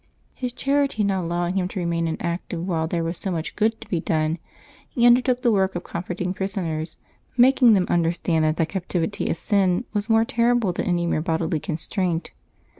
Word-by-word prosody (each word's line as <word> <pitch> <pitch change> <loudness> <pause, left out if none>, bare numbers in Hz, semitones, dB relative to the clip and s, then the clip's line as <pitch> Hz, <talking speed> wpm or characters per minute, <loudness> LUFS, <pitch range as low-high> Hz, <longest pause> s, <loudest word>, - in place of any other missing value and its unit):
His 250 -1 -4
charity 275 -3 0
not 190 -3 0
allowing 175 +2 -1
him 180 - 0
to 190 - -5
remain 170 -1 0
inactive 170 +1 -3
while 160 -3 0
there 170 0 -1
was 165 +1 -3
so 195 - -3
much 165 -3 -3
good 220 +1 +1
to 225 - -10
be 180 -5 -1
done, 160 +1 0 0.5
he 240 - +1
undertook 245 +1 +4
the 240 - +4
work 190 -2 +1
of 175 - -3
comforting 180 +1 -4
prisoners, 175 -5 -3 0.4
making 250 -1 +6
them 190 -3 +3
understand 170 -1 +1
that 155 +1 +1
the 165 - +2
captivity 185 +2 -2
of - - -1
sin 195 +1 +1
was 210 +1 -2
more 225 0 +4
terrible 235 -5 +2
than - - -3
any 175 -1 +1
mere 160 -2 0
bodily 160 0 -1
constraint. 170 +1 -2
180 Hz, 190 wpm, -23 LUFS, 170-215 Hz, 0.5 s, making